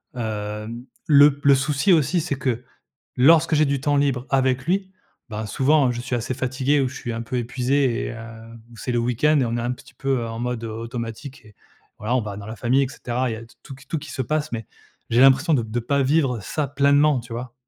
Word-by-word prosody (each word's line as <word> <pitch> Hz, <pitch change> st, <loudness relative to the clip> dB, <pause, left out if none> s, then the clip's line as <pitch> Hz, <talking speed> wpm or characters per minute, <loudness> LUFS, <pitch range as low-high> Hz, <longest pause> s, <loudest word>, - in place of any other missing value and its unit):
hem, 110 Hz, +1 st, -5 dB, 0.2 s
le 145 Hz, -1 st, +7 dB
p -, -, -22 dB
le 140 Hz, -1 st, +7 dB
souci, 140 Hz, +7 st, +2 dB
aussi, 170 Hz, +2 st, +2 dB
c'est 150 Hz, -3 st, -2 dB
que, 125 Hz, -2 st, -2 dB, 0.5 s
lorsque 160 Hz, +5 st, +5 dB
j'ai 155 Hz, -, +4 dB
du 140 Hz, -2 st, 0 dB
temps 145 Hz, +1 st, +1 dB
libre 140 Hz, -3 st, +1 dB
avec 130 Hz, -1 st, +1 dB
lui, 190 Hz, +2 st, -1 dB, 0.4 s
bah, 110 Hz, 0 st, -4 dB
souvent, 135 Hz, +6 st, +3 dB
heu, -, -, +1 dB
je 120 Hz, -, -5 dB
suis 125 Hz, +1 st, -4 dB
assez 120 Hz, +2 st, -2 dB
fatigué 130 Hz, +3 st, 0 dB
ou 135 Hz, -, +1 dB
je 135 Hz, -, -11 dB
suis 120 Hz, -3 st, -5 dB
un 115 Hz, 0 st, -4 dB
peu 115 Hz, +2 st, -4 dB
épuisé 125 Hz, +1 st, 0 dB
et -, -, -5 dB
heu, -, -, -8 dB, 0.5 s
ou 115 Hz, -, -14 dB
c'est 125 Hz, -, -4 dB
le 120 Hz, -, +1 dB
week-end 125 Hz, +6 st, +2 dB
et -, -, +2 dB
on 115 Hz, 0 st, -2 dB
est -, -, -2 dB
un 120 Hz, +1 st, -1 dB
petit 125 Hz, -, -12 dB
peu, 135 Hz, -1 st, -1 dB
heu, 115 Hz, -, -4 dB
en 115 Hz, 0 st, -6 dB
mode 120 Hz, -1 st, -3 dB
automatique 115 Hz, +4 st, -6 dB
et 105 Hz, -1 st, -18 dB, 0.4 s
voilà, 110 Hz, +4 st, -2 dB
on 130 Hz, -, +2 dB
va 105 Hz, -2 st, -6 dB
dans 100 Hz, 0 st, -8 dB
la 110 Hz, -, -6 dB
famille 125 Hz, +4 st, +2 dB
et -, -, -4 dB
cetera, 125 Hz, -1 st, -3 dB
il -, -, -2 dB
y -, -, -6 dB
a 115 Hz, -, -9 dB
t 115 Hz, -, -20 dB
tout 135 Hz, -, -9 dB
qu 135 Hz, +2 st, -16 dB
tout 160 Hz, -, -2 dB
qui 145 Hz, -2 st, -9 dB
se 130 Hz, -, -2 dB
passe, 155 Hz, +4 st, -2 dB
mais 115 Hz, -3 st, -4 dB, 0.4 s
j'ai 120 Hz, -, +3 dB
l'impression 135 Hz, +5 st, +5 dB
de 125 Hz, -, +2 dB
de 115 Hz, +2 st, -3 dB
pas 140 Hz, +4 st, +1 dB
vivre 135 Hz, -3 st, +1 dB
ça 145 Hz, +8 st, -3 dB
pleinement. 140 Hz, +1 st, +3 dB
Tu 120 Hz, 0 st, -12 dB
vois? 120 Hz, +1 st, -6 dB
130 Hz, 250 wpm, -23 LUFS, 115-140 Hz, 0.5 s, le